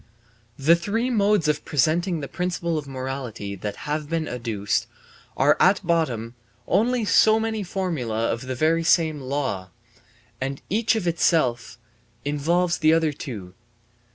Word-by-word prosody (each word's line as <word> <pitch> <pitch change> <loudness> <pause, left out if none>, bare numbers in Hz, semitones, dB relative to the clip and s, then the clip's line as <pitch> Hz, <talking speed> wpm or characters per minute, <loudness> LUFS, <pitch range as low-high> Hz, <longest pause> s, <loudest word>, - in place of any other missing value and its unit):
The 155 +5 +5
three 225 +8 -1
modes 205 -6 +2
of 150 -1 0
presenting 160 +4 +1
the 140 - -5
principle 170 +3 -2
of 150 -2 -3
morality 130 -6 -5
that 105 +2 -4
have 150 0 -2
been 165 -1 -1
adduced 115 -5 -2 0.5
are 145 +2 +4
at 190 0 +4
bottom 125 -10 0 0.3
only 235 +1 +2
so 220 +1 +5
many 220 -1 -2
formulae 160 - -2
of 120 +3 -4
the 130 - -3
very 160 +5 +2
same 160 -2 +3
law, 130 -9 -3 0.7
and 135 +1 -3
each 225 +3 +2
of 205 -5 -2
itself 130 -9 +1 0.5
involves 170 +5 +1
the 155 0 +4
other 160 -2 +2
two. 100 -10 -7
155 Hz, 140 wpm, -24 LUFS, 130-180 Hz, 0.7 s, The